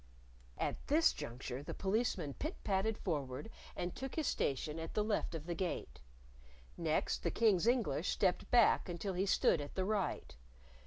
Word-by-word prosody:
At - - -3
this 315 +3 +5
juncture 125 +2 -5
the 145 - -6
Policeman 195 - 0
pit 310 - -4
patted 205 +2 +1
forward 145 - -3 0.2
and 175 0 -3
took 265 0 -5
his 315 - 0
station 150 - -1
at 165 0 -6
the 210 - +2
left 210 -5 -1
of 160 -1 -5
the 175 - -2
Gate. 175 - -3 0.7
Next, - - 0
the - - 0
King's 215 -4 +3
English 225 - +2
stepped 185 -3 +1
back 235 -5 +5
until 180 +3 -3
he 190 +2 0
stood 165 - +3
at 145 - -7
the 185 - 0
right. 200 - -1
190 Hz, 165 wpm, -36 LUFS, 160-220 Hz, 0.7 s, this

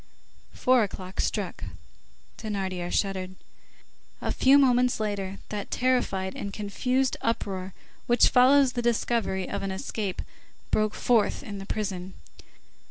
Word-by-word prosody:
Four 255 -1 +4
o'clock 190 -1 -5
struck. - - -2 0.8
Thénardier 190 -5 -3
shuddered. 185 -2 -1 0.8
A - - -2
few 270 +2 +5
moments 250 -3 +3
later, 200 -2 -3
that 205 -2 -4
terrified 245 -7 0
and 200 - -5
confused 250 +6 -1
uproar 190 -5 -2 0.3
which 240 0 +5
follows 265 +1 +5
the 240 - -1
discovery 230 -5 0
of - - -3
an 195 - -3
escape 190 +1 -4 0.5
broke 215 -1 +1
forth 230 0 +2
in 205 -6 -6
the 195 - -8
prison. 190 -3 -4
210 Hz, 120 wpm, -27 LUFS, 190-245 Hz, 0.8 s, few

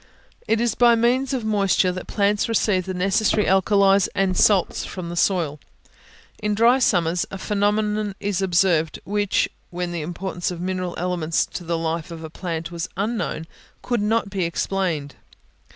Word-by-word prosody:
It 225 - +2
is 235 -2 +1
by 240 0 +5
means 245 +3 +1
of 255 -5 -2
moisture 195 -3 +2
that 185 0 -7
plants 205 +1 +1
receive 200 -4 +1
the 185 - -2
necessary 195 +3 +2
alkalies 195 0 +4
and 195 -2 +1
salts 195 -1 +3
from 180 -3 -6
the 175 - -5
soil. 170 -5 +1 0.8
In 210 -1 0
dry 235 +4 +4
summers 175 -7 +1
a 195 - -6
phenomenon 210 0 0
is 200 -1 -1
observed, 175 -4 +2
which, 205 0 +1 0.2
when 175 0 -4
the 170 -2 -3
importance 175 +2 -4
of 175 -2 -6
mineral 185 0 -3
elements 170 -2 0
to 180 - -7
the 170 0 -1
life 165 0 -3
of 165 -1 -8
a 160 - -8
plant 165 -2 -5
was 170 -1 -4
unknown, 200 -6 -2 0.4
could 240 -3 0
not 210 -1 0
be 190 -2 -1
explained. 170 -4 -2
190 Hz, 165 wpm, -22 LUFS, 175-210 Hz, 0.8 s, by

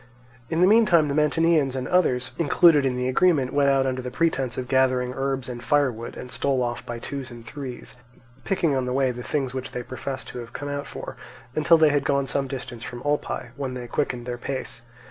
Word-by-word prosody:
In 165 +1 0
the 180 - +7
meantime 190 -8 +5
the - - 0
Mantineans 150 -2 +2
and 130 -1 -3
others 130 -9 +2
included 155 -2 +5
in 125 -1 -1
the 125 0 -1
agreement 135 -1 +2
went 140 -1 +4
out 135 -1 +3
under 130 -1 -1
the 125 - -5
pretence 135 -3 0
of 125 - -3
gathering 130 -1 +2
herbs 135 -1 -2
and 120 -1 -6
firewood, 125 -4 0
and 125 - -8
stole 135 -2 0
off 120 0 -3
by 120 - -5
twos 135 +2 -5
and 120 -1 -11
threes, 130 -1 -7 0.5
picking 170 -7 +1
on 130 -1 0
the 125 - -1
way 135 -1 +2
the 125 0 -7
things 135 -1 -2
which 130 -1 -5
they 125 - -4
professed 130 +2 -6
to 125 - -7
have 120 -1 -9
come 145 - -5
out 145 0 -4
for, - - -8 0.4
until 155 +3 +5
they 160 -1 +5
had 145 -1 +1
gone 140 -1 +1
some 135 +1 -1
distance 130 -3 -6
from 120 0 -7
Olpae, 145 -4 -1
when 135 -2 -4
they 125 -1 -5
quickened 120 -1 -2
their 120 -1 -4
pace. 130 -2 -4
135 Hz, 220 wpm, -25 LUFS, 125-145 Hz, 0.5 s, the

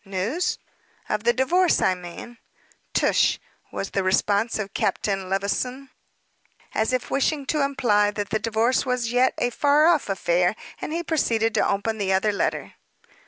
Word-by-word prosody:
"News!" 205 - -2 0.5
"Of 210 +1 -2
the 240 - +5
divorce, 335 +9 +2
I 185 - +3
mean?" 180 +7 -10 0.5
"Tush!" - - +2 0.3
was 195 - -5
the 195 - 0
response 200 +4 +1
of 200 -2 -5
Captain 195 -2 -1
Levison, 250 +8 -2 0.8
as 220 +3 0
if 255 -1 -2
wishing 280 +1 0
to 300 +2 0
imply 225 -7 +2
that 205 -1 -5
the 220 - +1
divorce 230 +3 +1
was 250 -3 -1
yet 250 +1 +2
a 245 - 0
far 290 +4 +3
off 335 -9 +3
affair, 180 0 +1 0.3
and - - -4
he 335 +2 -2
proceeded 230 -9 0
to - - +2
open 215 +2 -1
the 190 -1 0
other 195 +3 +2
letter. 200 - -2
225 Hz, 160 wpm, -24 LUFS, 200-260 Hz, 0.8 s, the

